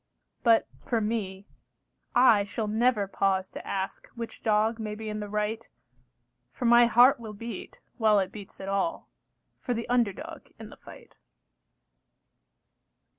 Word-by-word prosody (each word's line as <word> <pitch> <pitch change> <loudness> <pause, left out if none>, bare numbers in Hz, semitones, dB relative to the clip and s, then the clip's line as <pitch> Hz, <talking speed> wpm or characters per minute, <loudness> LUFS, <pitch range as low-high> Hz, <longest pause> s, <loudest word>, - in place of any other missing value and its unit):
But 230 -2 +4 0.2
for 235 - 0
me, 205 -3 -3 0.7
I 240 -4 +6
shall 215 +2 -4
never 220 -1 +2
pause 190 -1 0
to - - -9
ask 190 0 -4
Which 230 -1 -7
dog 220 +1 +1
may 210 -1 -4
be 220 0 -6
in 210 0 -4
the 210 -1 -6
right, 210 +2 -2 0.8
For 245 - -5
my 235 0 +7
heart 245 +3 +6
will 220 -2 -8
beat, 230 0 -8 0.2
while 215 -2 +4
it 190 -1 0
beats 205 -3 -11
at 195 - -7
all, 200 +12 -2 0.5
For 245 - -2
the 230 - -4
under 240 -4 +3
dog 185 - -10
in - - -10
the - - -14
fight. - - -15
215 Hz, 150 wpm, -27 LUFS, 200-235 Hz, 0.8 s, my